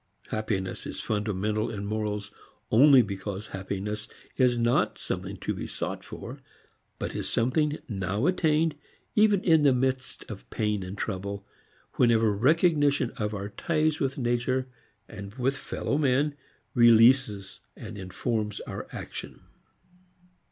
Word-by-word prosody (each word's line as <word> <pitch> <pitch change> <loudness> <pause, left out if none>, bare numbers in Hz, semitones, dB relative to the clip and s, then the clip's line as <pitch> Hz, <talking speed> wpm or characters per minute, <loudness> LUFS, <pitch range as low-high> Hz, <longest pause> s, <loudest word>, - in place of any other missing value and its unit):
Happiness 105 -4 -2
is - - -6
fundamental 105 0 -1
in 100 -3 -5
morals 105 -1 -2 0.4
only 135 +2 +7
because 100 0 -5
happiness 100 +3 -4 0.3
is 125 -2 +3
not 120 +1 +2
something - - -4
to - - -2
be - - -5
sought - - -4
for, - - -8 0.6
but - - -4
is - - -3
something 150 +6 +1
now 100 +2 -1
attained, 160 -3 +2 0.4
even 210 -2 +4
in 160 -3 +5
the 140 -3 +5
midst 130 +1 -1
of 110 -5 -9
pain 105 -2 -1
and 95 +2 -6
trouble, 100 0 -4 0.5
whenever 115 -3 +4
recognition 145 - +3
of 105 0 -2
our 100 0 -4
ties 155 +7 0
with 135 0 -1
nature 125 +1 0 0.4
and 100 +2 -9
with 135 +1 0
fellow 140 +1 -2
men 140 +1 +2 0.4
releases 115 -4 +5 0.2
and - - -8
informs 105 +2 -3
our - - -6
action. - - -7
115 Hz, 130 wpm, -27 LUFS, 105-135 Hz, 0.6 s, only